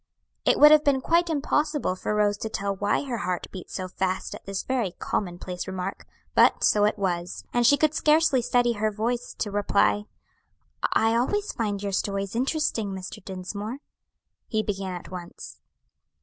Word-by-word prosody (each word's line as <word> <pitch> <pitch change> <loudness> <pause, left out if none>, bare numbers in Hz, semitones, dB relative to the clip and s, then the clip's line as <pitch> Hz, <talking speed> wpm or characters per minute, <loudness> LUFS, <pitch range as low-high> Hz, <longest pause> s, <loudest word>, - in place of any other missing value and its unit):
It - - +4
would 300 0 +9
have 305 -1 +7
been 280 -2 +3
quite 340 +5 +2
impossible 295 - 0
for 210 +3 -2
Rose 205 -1 +2
to 220 - -4
tell 200 -2 -2
why 205 +6 0
her 250 -5 -3
heart 180 -3 -2
beat 185 -2 -9
so 185 -1 -4
fast 185 0 -2
at - - -9
this 195 -1 -3
very 240 -9 -1
commonplace 180 -1 -3
remark, 190 0 -5 0.3
but - - +4
so 205 -1 +4
it 210 +1 +1
was; 180 -3 -2
and 240 -1 +4
she 285 - +6
could 310 0 +2
scarcely 310 -4 +3
steady 245 0 +2
her 215 0 0
voice 235 +3 -3
to 210 - -2
reply, 205 0 +2 0.9
"I 225 +1 +3
always 410 - 0
find 205 -3 -2
your 200 - -2
stories 195 +1 -2
interesting, 245 -6 0
Mr. 185 0 -8
Dinsmore." 200 +5 -5 0.7
He 215 -2 0
began 195 -3 -3
at 175 - -9
once. 175 -2 -9
210 Hz, 170 wpm, -26 LUFS, 190-250 Hz, 0.9 s, would